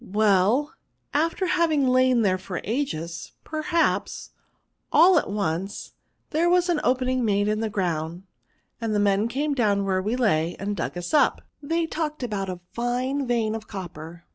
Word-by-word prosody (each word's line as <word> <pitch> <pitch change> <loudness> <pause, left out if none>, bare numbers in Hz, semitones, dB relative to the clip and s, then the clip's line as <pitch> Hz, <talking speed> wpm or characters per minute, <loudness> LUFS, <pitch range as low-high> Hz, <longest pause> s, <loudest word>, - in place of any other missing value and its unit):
" - - -18 0.2
Well, 215 - +3 0.4
after 330 +6 +1
having 320 -6 +2
lain 255 -2 +4
there 185 -2 +2
for 185 -1 -5
ages, 170 - -3
perhaps, 325 +2 -1 0.6
all 340 +3 +6
at - - -5
once 195 -1 -3 0.4
liiere 330 +3 +2
was 355 0 +3
an 340 -3 +2
opening 255 0 +1
made 205 -2 +1
in 215 0 0
the 220 -1 -1
ground, 175 -3 -2 0.6
and 225 -2 -1
men 200 +2 +2
came 285 +5 -1
down 205 -6 +1
where 190 -1 +1
we 215 +5 -1
lay, 175 -9 +1
and 205 +1 -3
dug 175 0 -4
us 175 - -5
up; 300 - +3 0.2
they 330 +3 0
talked 305 -3 -3
about 200 -5 -3
a 180 -1 -6
fine 255 +3 -1
vein 230 -3 +1
of 220 -1 -6
copper. 170 -3 -8
225 Hz, 165 wpm, -25 LUFS, 195-285 Hz, 0.6 s, all